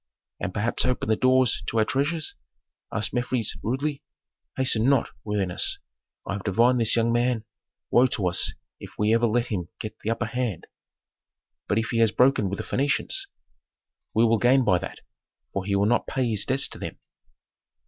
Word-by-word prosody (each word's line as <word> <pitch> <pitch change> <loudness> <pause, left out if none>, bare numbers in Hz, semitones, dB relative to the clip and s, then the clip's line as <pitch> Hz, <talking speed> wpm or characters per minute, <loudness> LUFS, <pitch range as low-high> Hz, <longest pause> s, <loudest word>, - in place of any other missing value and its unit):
"And 90 - -3
perhaps 110 +4 0
open 125 -3 -1
the 110 - +4
doors 130 0 +3
to 115 - -2
our 110 - +4
treasures?" 145 +6 -1 0.6
asked 110 - -1
Mefres, 120 -2 -1
rudely. 140 +5 -2 0.6
"Hasten 125 -2 +2
not, 140 -4 +2
worthiness, 100 -4 0 0.5
I - - -3
have 100 -1 -5
divined 120 +5 +3
this 115 - +4
young 115 0 +2
man 120 -1 +1 0.5
woe 125 +2 +5
to 105 -6 -1
us 90 - +1 0.2
if - - -9
ever 115 +3 +3
we 110 - -2
let 120 - -4
him 90 -5 -3
get 110 - -7
the 110 - -4
upper 115 +1 -1
hand." 120 -5 -3 1.0
"But 100 - +1
if 115 - 0
he 115 - 0
has 115 -1 +5
broken 125 -4 +3
with 100 - -3
the - - -4
Phœnicians?" 145 - -1 0.9
"He 110 - +4
will 115 -1 +3
gain 130 +3 +4
by 95 -5 +3
that; 95 - -8 0.5
for 95 -1 -2
he 100 -1 0
will 100 +1 +2
not 120 +3 +1
pay 130 -2 0
his 110 -3 +1
debts 135 +2 +2
to - - -7
them." - - -6
115 Hz, 180 wpm, -25 LUFS, 105-125 Hz, 1.0 s, woe